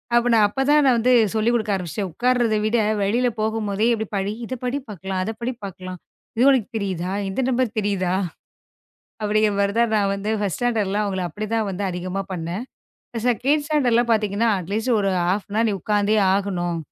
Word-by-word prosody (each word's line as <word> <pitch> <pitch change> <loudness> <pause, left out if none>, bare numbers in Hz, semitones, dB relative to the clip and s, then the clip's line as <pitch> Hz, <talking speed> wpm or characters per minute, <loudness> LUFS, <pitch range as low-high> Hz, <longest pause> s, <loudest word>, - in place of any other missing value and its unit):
அப்ப 240 +1 +3
நான் 220 -2 +5
அப்பத் 270 +6 -2
தான் 300 0 +6
நான் 260 -2 +5
வந்து 250 +2 +3 0.2
சொல்லிக் 225 +2 +1
குடுக்க 215 -3 0
ஆரம்பிச்டேன். 185 +1 -4
உட்கார்றத 240 +3 +1
விட 225 +2 +2 0.2
வெளியில 230 +6 +1
போகும்போதே 215 -1 0
இதப் 220 -1 -6
படி 195 +1 -1
இதப் 255 +1 -6
படி 250 +2 -1
பார்க்கலாம், 190 -1 -4
அதப் 220 +3 -5
படி 240 +2 -1
பார்க்கலாம். 185 -2 -7 0.4
இது 235 - +2
உனக்குத் 250 -3 +1
தெரியுதா? 185 -3 -3 0.2
இந்த 190 - -4
நம்பர் 250 -3 0
தெரியுதா? 190 -3 0 1.1
அப்படிங்கிற 210 0 +2
மாரி 200 0 +1
தான், 235 0 +3
நான் 200 -2 +2
வந்து 205 +2 -3
1 200 -4 -2
ஸ்டாண்டர்ட்டுலாம் 210 -4 0
அவங்கள 190 -2 -2
அப்படி 210 +7 -5
தான் 220 -2 0
வந்து 195 +1 -4
அதிகமா 185 +2 -3
பண்ணேன். 175 +4 -4 0.6
2 275 +5 +2
ஸ்டாண்டர்டுலாம் 245 -6 +2
பாத்தீங்கன்னா, 215 +1 +1
அட்லீஸ்ட், 210 +8 -2
0:30 195 +3 0
நீ - - 0
உக்காந்தே 210 0 +1 0.2
ஆகணும். 180 -4 -1
210 Hz, 170 wpm, -22 LUFS, 195-235 Hz, 1.1 s, தான்